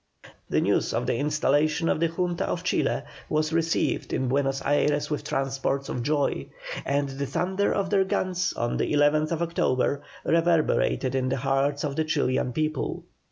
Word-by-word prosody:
The - - +2
news - - +1
of - - 0
the - - 0
installation 150 +3 +1
of - - +1
the 165 - +3
Junta 175 +1 -1
of - - -2
Chile - - 0 0.3
was 155 +1 0
received 165 0 0
in 130 - 0
Buenos 135 0 +1
Ayres 145 +1 +1
with 150 - -2
transports 135 -1 -1
of 125 - -2
joy, 140 - 0 0.4
and 140 +1 +1
the 135 +1 -4
thunder 190 +8 0
of 200 -1 -1
their 195 -2 +4
guns 185 -1 -1
on 120 +1 -1
the - - -1
11th 150 +1 +3
October, 155 -5 0 0.2
reverberated 165 -5 +2
in 130 -1 0
the - - 0
hearts 135 +2 0
of 140 -2 -2
the 160 - +1
Chilian 140 -5 0
people. 155 +1 -2
150 Hz, 165 wpm, -26 LUFS, 135-165 Hz, 0.4 s, their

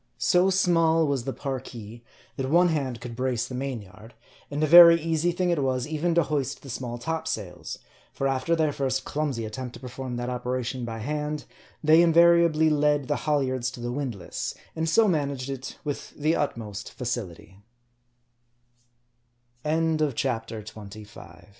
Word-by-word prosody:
So 180 +10 +3
small 165 -3 +3
was 140 -5 -1
the 135 - -2
Parki, 120 -4 -6 0.3
that 135 -1 -3
one 175 +3 +5
hand 135 -7 -2
could 120 -1 -8
brace 125 -1 -1
the 130 - -9
main 130 -3 -3
yard; 105 +5 -15 0.3
and 145 +2 -2
a - - +5
very 170 +1 +9
easy 165 +1 0
thing 175 +1 0
it 165 -4 +1
was, 130 -2 0
even 160 +2 -1
to 170 - +4
hoist 140 -2 -2
the 135 - -8
small 120 -1 -5
top 160 +6 -3
sails; - - -5 0.3
for 135 - -1
after 135 +5 +1
their 155 -3 +1
first 135 -1 -1
clumsy 145 -7 -2
attempt 120 +2 -6
to - - -10
perform 130 0 -6
that 120 0 -3
operation 125 0 -3
by 115 -1 -5
hand, 150 +5 -3 0.4
they 155 +2 +6
invariably 170 -2 +5
led 145 -2 +2
the - - +2
halyards 130 -4 +1
to 125 - -10
the 120 0 -3
windlass, 120 -9 -4 0.2
and 160 0 -1
so 220 +6 +4
managed 140 -6 -1
it, 135 0 -7
with 145 -2 -4
the 155 +2 +1
utmo 115 -9 -2
140 Hz, 150 wpm, -26 LUFS, 125-160 Hz, 0.4 s, very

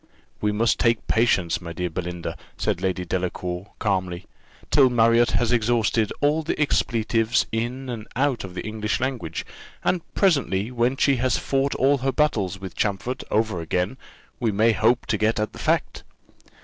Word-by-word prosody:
"We 105 - +1
must 110 +2 +1
take 115 -2 +2
patience, 105 -8 +2
my 85 -1 -7
dear 90 +1 -3
Belinda," 90 0 -4 0.2
said - - -1
Lady 95 -1 -1
Delacour, 90 +1 -3
calmly, 95 -3 -1 0.5
"till 135 -3 +6
Marriott 115 -1 +4
has 120 -1 +1
exhausted 115 -2 +2
all 150 +2 +3
the 155 - -3
expletives 115 -5 +1
in 120 +4 -3
and 115 -3 -6
out 135 -2 +1
of 90 -2 -8
the - - -5
English 110 0 -2
language; 120 -11 -3 0.4
and 180 - +1
presently, 130 - +2
when 125 +2 +1
she 140 -1 +3
has 130 +1 +1
fought 135 0 0
all 140 +1 +3
her 135 +1 0
battles 105 - 0
with 95 -2 -7
Champfort 105 +5 -2
over 110 -5 0
again, 90 +7 -1 0.4
we 115 -3 +1
may 110 +3 +3
hope 115 +3 +2
to 110 - -1
get 110 0 +2
at 105 - -2
the - - -10
fact." - - 0
110 Hz, 165 wpm, -24 LUFS, 95-125 Hz, 0.5 s, till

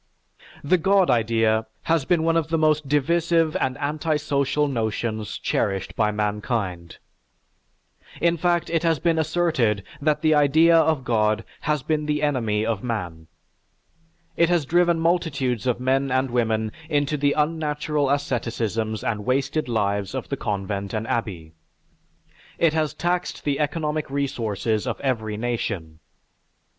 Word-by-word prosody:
The 175 +5 +3
God 190 -2 +3
idea 115 -1 +2 0.2
has 165 -4 +1
been 170 0 +2
one 165 0 +2
of 165 -2 +1
the 165 0 0
most 155 -2 +2
divisive 165 +3 +2
and 130 -1 -1
anti 150 +2 -1
social 145 0 0
notions 110 -3 -2
cherished 95 -2 -1
by 105 -2 +2
mankind. 105 -4 -2 1.2
In 170 0 +2
fact 175 0 0
it 165 -2 +1
has 165 -2 +2
been 165 +1 +1
asserted 155 - +1 0.2
that 150 +1 +1
the 155 0 +4
idea 155 +3 +5
of 160 -4 +3
God 110 -2 +1 0.3
has 150 -3 +1
been 150 0 -1
the 150 0 0
enemy 115 -7 0
of 110 -3 -2
man. 90 -9 -4 1.1
It 170 0 +3
has 175 -4 +2
driven 170 +2 +3
multitudes 145 - 0
of 125 -1 +1
men 135 +2 +1
and 130 0 0
women 110 -2 0 0.2
into 145 0 +1
the 145 0 +2
unnatural 150 -1 0
asceticisms 115 -6 -1
and 105 -2 -2
wasted 135 +4 0
lives 100 -3 -1
of - - -5
the - - -1
convent 100 0 -3
and 110 +1 -2
abbey. 95 -9 -3 1.1
It 165 -2 +3
has 155 -2 0
taxed 175 +1 -2
the 140 -2 -1
economic 150 0 -1
resources 115 -6 -1
of - - -3
every 110 -6 -1
nation. 100 -9 -3
135 Hz, 140 wpm, -23 LUFS, 110-155 Hz, 1.2 s, idea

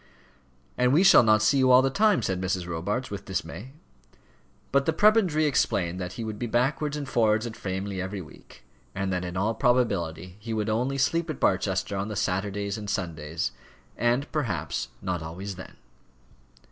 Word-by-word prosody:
"And 125 0 +4
we 165 +6 +5
shall 195 - +8
not 110 -1 +4
see 135 +5 +3
you 130 -1 +4
all 125 +1 +7
the 135 - +1
time," 210 - +3
said 95 -2 -1
Mrs. 95 -1 -1
Robarts 100 +10 -3
with 100 - -6
dismay. 95 +6 -5 1.0
But 140 0 +2
the 160 - +3
prebendary 190 -5 +4
explained 90 - 0
that 90 -1 -5
he 115 - -5
would 110 -1 -5
be 120 - -2
backwards 140 +5 0
and 145 -2 -5
forwards 110 -3 +2
at 115 -2 -6
Framley 95 0 -4
every 95 +2 -4
week, 80 -4 -14 0.3
and 95 -1 -1
that 90 0 -1
in 90 0 -5
all 105 +4 +1
probability 100 -9 0
he 110 +1 -4
would 110 0 -1
only 125 +5 0
sleep 165 +5 +1
at 155 - -4
Barchester 95 +1 0
on 100 +1 -2
the 105 - -5
Saturdays 100 +2 -2
and 105 -1 -6
Sundays 80 -6 -3 0.4
and, 120 +4 0
perhaps, 125 - -2 0.2
not 90 -2 -2
always 90 +5 -6
then. 90 - -11
105 Hz, 180 wpm, -26 LUFS, 95-130 Hz, 1.0 s, shall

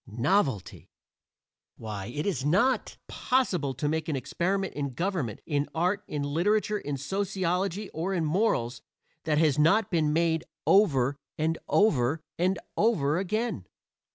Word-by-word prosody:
Novelty! 120 - 0 0.9
Why, 105 -3 -6
it 145 +6 -4
is 190 -9 -1
not 200 - +1
possible 180 - 0
to 145 +4 -2
make 160 +1 -1
an 150 - 0
experiment 190 +8 -1
in 140 -3 -4
government, 170 - -2
in 145 -2 -1
art, 180 +5 +1
in 145 -1 -3
literature, 205 +8 +1
in 145 -5 -4
sociology, 190 +4 -1
or 170 +5 -3
in 175 -4 0
morals, 150 - 0 0.4
that 150 -2 +1
has 150 -2 +3
not 195 +7 +3
been 155 -4 +2
made 160 0 +1 0.2
over, 140 -10 +4 0.2
and 160 +1 0
over, 155 - +3 0.2
and 185 +2 +2 0.2
over 170 -9 +2
again. 205 - -2
165 Hz, 135 wpm, -28 LUFS, 140-195 Hz, 0.9 s, over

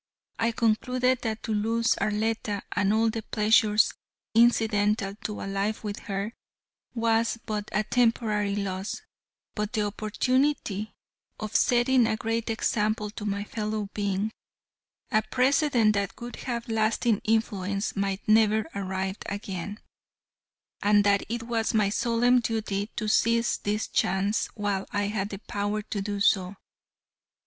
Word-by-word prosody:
I 230 +1 +2
concluded 250 +3 +1
that 220 -1 -3
to 220 - -2
lose 225 +2 +2
Arletta, 215 -1 -1
and 200 0 +1
all 220 +1 +3
the 225 0 -4
pleasures 215 0 +3 0.4
incidental 215 -3 +3
to 210 - -3
a - - -4
life 200 +3 -2
with 205 -1 -4
her, 200 +2 -4 0.6
was 230 0 +1
but 210 -1 -3
a 210 - +1
temporary 215 -4 +1
loss, 195 0 -3 0.5
but 210 +1 -3
the 215 -3 +1
opportunity 215 +1 0 0.4
of 215 0 -5
setting 245 0 +4
a 220 -1 0
great 225 +1 -2
example 215 -1 0
to 210 - -7
my 200 0 -1
fellow 215 -1 -3
beings, 200 +1 -1 0.8
a 215 -2 +4
precedent 250 -1 +3
that 200 -1 -2
would 240 0 -7
have 235 -3 -4
lasting 220 0 +1
influence, 205 -2 0
might 195 0 -2
never 215 0 +4
arrive 190 0 -3
again, 200 0 -5 1.0
and 205 0 +4
that 200 -1 +3
it 235 0 -3
was 230 -1 -1
my 210 -2 +3
solemn 240 +3 +3
duty 215 -3 -2
to 215 - -2
seize 230 +2 +2
this 210 +1 -2
chance 195 +3 +1
while 205 -3 -2
I 205 0 0
had 200 -1 -2
the 195 - -5
power 205 +1 -3
to 205 -1 -4
do 205 0 -3
so. 190 -1 +2
215 Hz, 140 wpm, -27 LUFS, 205-230 Hz, 1.0 s, setting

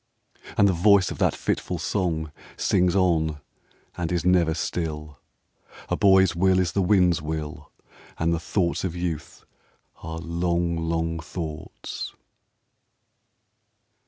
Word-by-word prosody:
And 100 - +6
the 95 - +3
voice 95 +2 +4
of - - -7
that - - +2
fitful - - -2
song 80 -6 -1 0.3
Sings 90 0 +2
on, 80 -5 +2 0.6
and 85 -1 -3
is 85 -1 -1
never 85 -3 +3
still: 75 -4 -4 0.7
"A - - +1
boy's 95 -3 +5
will 95 +2 +3
is 90 -3 +1
the 100 - +1
wind's 90 -4 +3
will, 75 -1 -5 0.5
And 85 +1 +1
the 85 - 0
thoughts 85 +2 -1
of 90 -3 -2
youth 85 -2 -5 0.6
are 80 0 -6
long, 85 0 -1
long 80 0 -1
thoughts." 80 0 -6
85 Hz, 125 wpm, -25 LUFS, 80-90 Hz, 0.7 s, And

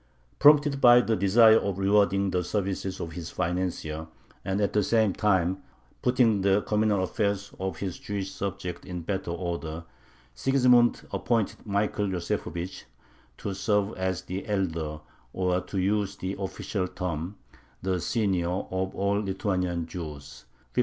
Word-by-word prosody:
Prompted 145 -1 +6
by 120 0 +8
the 115 -2 +1
desire 110 +3 +6
of 100 -2 -2
rewarding 100 0 +3
the 90 0 0
services 95 0 -2
of 80 - -5
his 85 0 -6
financier 85 -3 -2 0.4
and 95 +1 -1
at 100 - +1
the 105 - +3
same 110 -1 +2
time 95 -3 +1 0.4
putting 120 -5 +3
the 100 +1 +3
communal 105 -2 +1
affairs 100 +1 -1
of 95 -3 -3
his 95 0 -4
Jewish 100 -2 -4
subjects 95 -3 -5
in 90 -2 -5
better 95 0 -3
order, 85 -2 -4 0.5
Sigismund 125 - +3
appointed 115 -3 -1
Michael 105 0 0
Yosefovich 90 -1 -3 0.5
to 100 - -4
serve 105 +1 0
as 95 -1 -2
the 95 +2 -5
elder, 80 -7 -2 0.3
or, 90 -1 +1
to 95 +2 -6
use 100 +1 +1
the 95 0 -4
official 95 0 -3
term, 90 0 -4 0.5
the 95 -1 0
"senior," 95 -6 0
of 95 +1 -3
all 100 +1 +1
Lithuanian 90 -4 -1
Jews 75 -5 -8 0.3
(1514). - - -24
95 Hz, 140 wpm, -27 LUFS, 90-105 Hz, 0.5 s, by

